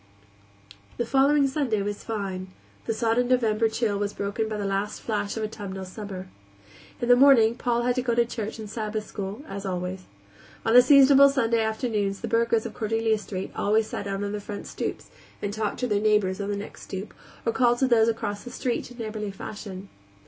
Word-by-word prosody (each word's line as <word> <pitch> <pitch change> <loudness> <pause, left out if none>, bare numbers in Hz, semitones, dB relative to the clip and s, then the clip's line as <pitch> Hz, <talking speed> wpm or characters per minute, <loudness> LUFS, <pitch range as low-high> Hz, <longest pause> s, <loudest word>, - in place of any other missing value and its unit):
The 240 - 0
following 275 +3 +4
Sunday 265 -7 0
was 205 0 -4
fine; 195 -4 -4 0.4
the 225 - +1
sodden 230 +2 +1
November 225 -3 +2
chill 220 -2 -1
was 205 0 -2
broken 205 +2 -2
by 215 - -3
the 205 - -3
last 195 +2 -2
flash 210 -1 -2
of 220 - -2
autumnal 200 -3 -5
summer. 190 -1 -7 0.7
In 240 - -2
the 245 - +7
morning 245 -4 +6
Paul 240 0 0
had 250 0 +2
to 255 - 0
go 240 -2 0
to 235 0 +4
church 225 -2 -5
and 220 -1 -7
Sabbath 215 0 -3
school, 205 +6 -6
as 195 0 -6
always. 185 -1 -4 0.6
On 225 - +2
seasonable 275 +1 +7
Sunday 235 -4 +1
afternoons 220 -3 -1
the 230 - -3
burghers 230 0 +2
of 230 - -5
Cordelia 225 0 0
Street 190 -2 -5
always 215 +2 +2
sat 205 -1 -5
out 195 0 -2
on 200 - -2
their 210 0 -4
front 205 0 -7
stoops - - -5 0.3
and 205 0 -3
talked 215 -1 -2
to 250 - +1
their 205 -3 +1
neighbors 210 -3 +2
on 200 - -3
the 205 - -1
next 205 - -8
stoop, 195 +2 -7 0.3
or 230 - +1
called 240 -2 +3
to 265 - +2
those 230 -3 +4
across 205 -3 -2
the 245 - -8
street 245 -1 -2
in 245 - -13
neighborly 215 -2 -4
fashion. 195 -1 -8
220 Hz, 200 wpm, -26 LUFS, 205-235 Hz, 0.7 s, the